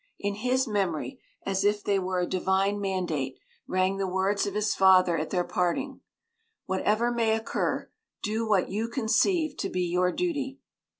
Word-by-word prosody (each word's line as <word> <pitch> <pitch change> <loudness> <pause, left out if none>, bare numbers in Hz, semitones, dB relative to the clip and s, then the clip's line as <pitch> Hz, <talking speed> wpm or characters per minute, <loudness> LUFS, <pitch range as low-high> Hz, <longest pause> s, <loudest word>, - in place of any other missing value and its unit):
In 205 0 -2
his 255 +5 0
memory, 200 - -2 0.2
as 195 -1 0
if 205 0 +1
they 200 -1 +1
were 185 0 -1
a - - +1
divine 190 +2 +1
mandate, 170 -9 -2 0.3
rang 185 +1 +1
the 195 -1 -1
words 190 +2 0
of 200 - -4
his 210 0 +1
father 185 -2 +5
at 155 -1 -2
their 180 -2 +1
parting: 180 +11 -1 0.6
"Whatever 210 +5 +1
may 230 -2 +2
occur, 225 0 -2 0.4
do 220 +1 -1
what 195 -4 +3
you 215 +4 -1
conceive 270 - +1
to - - -2
be 180 - -1
your 180 +1 +1
duty." 285 - -2
200 Hz, 165 wpm, -27 LUFS, 185-225 Hz, 0.6 s, father